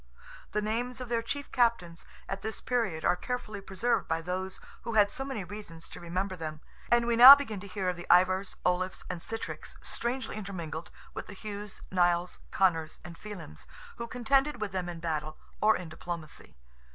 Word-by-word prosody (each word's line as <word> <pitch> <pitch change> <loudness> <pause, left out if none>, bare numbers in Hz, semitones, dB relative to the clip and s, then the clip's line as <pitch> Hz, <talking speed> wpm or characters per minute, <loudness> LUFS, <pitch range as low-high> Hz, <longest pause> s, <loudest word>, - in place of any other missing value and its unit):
The 210 - 0
names 240 +4 -2
of 250 -2 -6
their 235 -1 +1
chief 285 +5 -4
captains, 230 -9 +1 0.2
at 195 0 -4
this 220 +1 -4
period, 220 -11 -1
are - - +4
carefully 215 -2 -4
preserved 195 +5 0
by 165 0 -1
those 185 +2 -3 0.2
who 230 - -4
had 205 -1 +5
so 270 - -4
many 265 -7 -4
reasons 180 -3 -9
to - - -10
remember 185 +3 -2
them; 155 -3 -5 0.3
and 240 0 +5
we 235 0 +2
now 255 +4 +13
begin 225 -8 -4
to 200 - -9
hear 190 -1 -3
of 180 - +1
the 175 - -9
Ivars, 185 +2 +4
Olafs, 180 +1 0
and 170 - -6
Sitricks, 225 +5 -6
strangely 240 -1 -3
intermingled 170 -6 -5 0.2
with - - -6
the 205 - -9
Hughs, 205 0 -7
Nials, 175 -1 +2
Connors, 165 -4 +1
and 175 -1 -8
Felims, 210 +2 -9 0.3
who 235 - -4
contended 270 +5 +1
with 215 -2 -3
them 180 -2 -2
in 170 -1 -7
battle 155 -2 -3 0.2
or 220 +1 +5
in 180 - -7
diplomacy. 165 - -7
195 Hz, 185 wpm, -30 LUFS, 175-230 Hz, 0.3 s, now